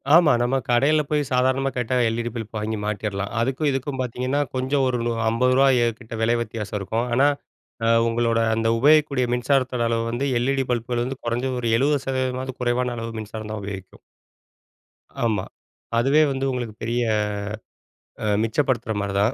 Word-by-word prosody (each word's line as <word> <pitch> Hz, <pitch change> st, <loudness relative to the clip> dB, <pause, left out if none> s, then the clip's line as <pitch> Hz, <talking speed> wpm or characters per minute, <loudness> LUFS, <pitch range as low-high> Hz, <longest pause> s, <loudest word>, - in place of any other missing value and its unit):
ஆமா, 170 Hz, -3 st, +6 dB
நம்ம 125 Hz, +2 st, +1 dB
கடையில 140 Hz, +6 st, +4 dB
போய் 150 Hz, -1 st, +2 dB
சாதாரணமா 130 Hz, +2 st, +2 dB
கேட்டா 125 Hz, +1 st, -1 dB
எல்-இ-டி 115 Hz, +1 st, -2 dB
பல்ப் 110 Hz, -1 st, -6 dB
வாங்கி 110 Hz, +1 st, -2 dB
மாட்டியறலாம். 100 Hz, -1 st, -3 dB
அதுக்கும் 135 Hz, +5 st, 0 dB
இதுக்கும் 135 Hz, 0 st, -3 dB
பார்த்தீங்கன்னா, 130 Hz, +3 st, -1 dB
கொஞ்சம் 130 Hz, +1 st, +1 dB
ஒரு 125 Hz, -1 st, 0 dB
நூ 120 Hz, -, 0 dB, 0.2 s
ரூ.50 125 Hz, +1 st, +3 dB
கிட்ட 115 Hz, -1 st, -11 dB
விலை 115 Hz, +1 st, +3 dB
வித்தியாசம் 110 Hz, -2 st, -4 dB
இருக்கும். 110 Hz, +5 st, -2 dB
ஆனா, 135 Hz, +4 st, +4 dB, 0.6 s
அ -, -, +3 dB, 0.2 s
உங்களோட 115 Hz, 0 st, +1 dB, 0.2 s
அந்த 115 Hz, 0 st, 0 dB
உபயோகிக்கூடிய 145 Hz, 0 st, +4 dB
மின்சாரத்தோட 125 Hz, -1 st, +1 dB
அளவு 115 Hz, 0 st, 0 dB
வந்து 120 Hz, +4 st, -1 dB
எல்-இ-டி 135 Hz, +2 st, 0 dB
பல்புகள் 120 Hz, 0 st, -1 dB
வந்து 130 Hz, +1 st, -5 dB
கொறஞ்சது 125 Hz, +2 st, -1 dB
ஒரு 120 Hz, -, -1 dB
70% 130 Hz, -1 st, -1 dB
குறைவான 125 Hz, 0 st, 0 dB
அளவு 115 Hz, 0 st, -4 dB
மின்சாரம் 110 Hz, 0 st, -7 dB
தான் 110 Hz, -1 st, -4 dB
உபயோகிக்கும். 95 Hz, -2 st, -8 dB, 1.3 s
ஆமா, 105 Hz, -4 st, 0 dB, 0.5 s
அதுவே 135 Hz, +6 st, +4 dB
வந்து 135 Hz, 0 st, -2 dB
உங்களுக்கு 120 Hz, -4 st, -4 dB
பெரிய 120 Hz, +2 st, 0 dB, 1.2 s
அ -, -, -1 dB, 0.2 s
மிச்சப்படுத்துற 115 Hz, 0 st, 0 dB
மாரி 100 Hz, -1 st, -3 dB
தான். 110 Hz, +5 st, +2 dB
120 Hz, 150 wpm, -23 LUFS, 115-135 Hz, 1.3 s, ஆமா